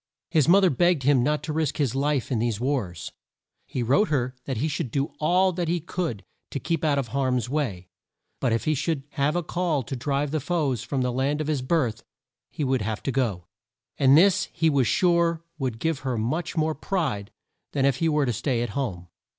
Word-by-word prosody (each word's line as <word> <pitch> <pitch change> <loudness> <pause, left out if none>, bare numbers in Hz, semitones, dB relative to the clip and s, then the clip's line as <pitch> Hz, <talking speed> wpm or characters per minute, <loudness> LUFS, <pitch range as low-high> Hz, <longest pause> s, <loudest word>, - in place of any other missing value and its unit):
His 155 -5 +3
mo 185 +4 +7
ther 190 -3 +4
begged 175 +1 +2
him 135 -1 +4
not 150 +3 0
to 155 0 -3
risk 155 -2 -1
his 140 -6 +1
life 140 -1 0
in 120 - +1
these 115 -2 0
wars. 120 - -2 0.6
He 125 - -2
wrote 140 - +3
her 130 -4 0
that 135 -4 -3
he 140 +8 0
should 140 -4 -2
do 140 +4 -2
all 180 +4 +3
that 175 -1 -2
he 175 +2 +1
could 165 - -4 0.2
to 140 - -4
keep 165 +2 -2
out 150 -2 +2
of 130 -4 -2
harm's 125 -3 0
way, 110 -12 -2 0.5
but 125 - +1
if 115 - 0
he 155 - +2
should 150 0 -1
have 145 +3 0
a 175 - 0
call 165 -4 -1
to 135 - -5
drive 140 +3 -1
the 155 - 0
foes 145 -5 -1
from 130 +2 -2
the 125 - 0
land 135 +4 0
of 155 - -1
his 150 -3 -1
birth, 125 -6 0 0.5
he 150 - -4
would 130 -3 +1
have 110 0 -3
to 135 - -1
go! 115 -10 -1 0.5
And 135 0 +6
this 190 +3 +5
he 160 -1 +2
was 135 -4 +2
sure 170 -2 +2 0.2
would 130 -5 -2
give 160 +3 -1
her 130 -3 -2
much 155 +10 -2
more 160 0 +2
pride 150 - -2 0.4
than 135 -2 +2
if 135 -2 +2
he 165 +2 +1
were 150 -2 +2
to 120 - 0
stay 120 +1 0
at 120 - -3
home. 100 -7 -3
140 Hz, 220 wpm, -25 LUFS, 125-160 Hz, 0.6 s, mo